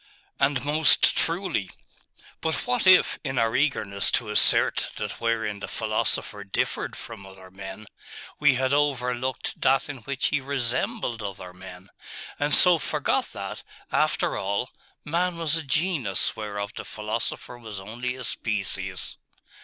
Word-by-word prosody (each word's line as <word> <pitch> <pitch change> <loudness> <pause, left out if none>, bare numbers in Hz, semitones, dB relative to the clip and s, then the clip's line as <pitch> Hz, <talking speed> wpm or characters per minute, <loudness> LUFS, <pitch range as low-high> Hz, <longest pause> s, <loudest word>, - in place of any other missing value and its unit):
'And 135 -2 +1
most 155 +2 +4
truly. 165 - 0 0.7
But 160 0 0
what 245 -5 0
if, 185 -1 +6
in 135 -3 -3
our 115 -1 +2
eagerness 110 -9 +2
to - - 0
assert - - +5
that - - -5
wherein 110 -3 -1
the - - -6
philosopher 110 -2 -1
differed 100 - -2
from 115 -4 -9
other 95 -1 -13
men, 95 +2 -9 0.5
we 150 -3 +5
had 130 +1 +1
overlooked 130 -3 -1
that 135 +1 +3
in 140 - -5
which 135 +3 -1
he 150 -2 0
resembled 135 - -1
other 95 -3 -7
men; 90 0 -12 0.5
and 145 0 +5
so 180 -2 +7
forgot - - 0
that, - - -6 0.3
after - - +1
all, 100 +5 -2 0.3
man 170 +3 0
was 165 -2 +1
a 165 - 0
genus 145 - +1
whereof 105 -1 -5
the - - -6
philosopher 110 +3 -4
was 110 -4 -7
only 120 +6 -4
a 130 - -7
species? 95 -5 -3
120 Hz, 140 wpm, -25 LUFS, 100-145 Hz, 0.7 s, so